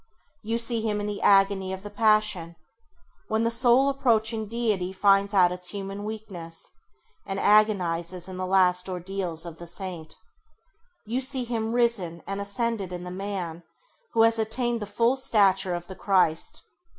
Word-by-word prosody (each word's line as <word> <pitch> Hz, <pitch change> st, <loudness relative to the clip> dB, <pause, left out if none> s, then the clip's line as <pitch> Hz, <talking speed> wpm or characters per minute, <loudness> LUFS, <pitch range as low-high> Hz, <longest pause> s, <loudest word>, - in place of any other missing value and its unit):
You 225 Hz, +1 st, -2 dB
see 235 Hz, -1 st, +1 dB
him 215 Hz, -2 st, -1 dB
in 205 Hz, -, -3 dB
the 205 Hz, -1 st, -4 dB
agony 195 Hz, -1 st, +3 dB
of 190 Hz, 0 st, -7 dB
the 205 Hz, -, -8 dB
passion, 210 Hz, -6 st, +2 dB, 0.7 s
when 220 Hz, +1 st, 0 dB
the 230 Hz, -, +1 dB
soul 245 Hz, +3 st, +4 dB
approaching 225 Hz, -5 st, +1 dB
Deity 210 Hz, -5 st, -1 dB
finds 195 Hz, +1 st, +3 dB
out 185 Hz, -3 st, +4 dB
its 180 Hz, 0 st, -4 dB
human 200 Hz, 0 st, -6 dB
weakness, 195 Hz, -7 st, -7 dB, 0.5 s
and 195 Hz, 0 st, -4 dB
agonises 185 Hz, -4 st, +2 dB
in 185 Hz, -1 st, -7 dB
the 185 Hz, 0 st, -3 dB
last 185 Hz, -1 st, +3 dB
ordeals 180 Hz, -2 st, -4 dB
of 165 Hz, -2 st, -9 dB
the 170 Hz, -, -8 dB
Saint. 175 Hz, -3 st, -7 dB, 0.9 s
You 240 Hz, +5 st, -2 dB
see 260 Hz, -1 st, +1 dB
him 230 Hz, -1 st, -3 dB
risen 215 Hz, -9 st, 0 dB
and 195 Hz, 0 st, -4 dB
ascended 200 Hz, -2 st, -2 dB
in 180 Hz, 0 st, -6 dB
the 180 Hz, -, -7 dB
man 185 Hz, -3 st, -5 dB, 0.5 s
who 225 Hz, -, +4 dB
has 225 Hz, 0 st, +3 dB
attained 235 Hz, +2 st, 0 dB
the 210 Hz, -, -5 dB
full 235 Hz, +5 st, +1 dB
stature 195 Hz, -7 st, +2 dB
of 175 Hz, 0 st, -6 dB
the 190 Hz, -, -9 dB
Christ. 185 Hz, -6 st, 0 dB
200 Hz, 165 wpm, -26 LUFS, 180-225 Hz, 0.9 s, soul